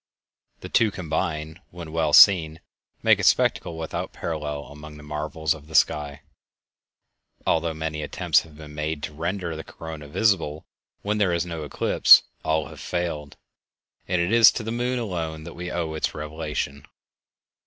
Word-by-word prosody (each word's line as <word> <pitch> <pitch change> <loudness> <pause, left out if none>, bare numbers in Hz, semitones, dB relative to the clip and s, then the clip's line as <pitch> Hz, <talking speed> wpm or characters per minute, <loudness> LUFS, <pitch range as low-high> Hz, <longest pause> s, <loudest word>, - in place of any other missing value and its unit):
The - - -8
two 115 - +3
combined, 80 -3 -3
when 85 -2 -9
well 80 -2 0
seen, 80 -3 +7 0.4
make - - +5
a - - -2
spectacle 85 - +2
without 80 -1 -5
parallel 75 -3 -4
among 75 +1 -12
the 75 - -12
marvels 75 +1 -2
of 75 -2 -13
the 80 - -9
sky. 75 -1 +1 1.2
Although 80 0 +1
many 80 -1 -4
attempts 75 - +2
have 80 -3 -16
been 75 -1 -11
made 75 0 -3
to - - -5
render 85 +2 -3
the 80 - -7
corona 80 -2 -9
visible 80 -3 0 0.4
when 105 +1 -1
there 100 -4 +2
is 85 0 0
no 85 -2 -5
eclipse, 70 - +6 0.2
all 80 -2 0
have - - -12
failed, 80 -5 -4 0.7
and 90 0 0
it 85 +3 0
is 115 -2 +8
to 115 - -4
the 110 - -4
moon 125 +2 -1
alone 85 -8 -4
that 85 - -9
we 90 +1 -6
owe 85 -3 -3
its 80 - -2
revelation. 75 -2 -5
80 Hz, 165 wpm, -24 LUFS, 75-85 Hz, 1.2 s, is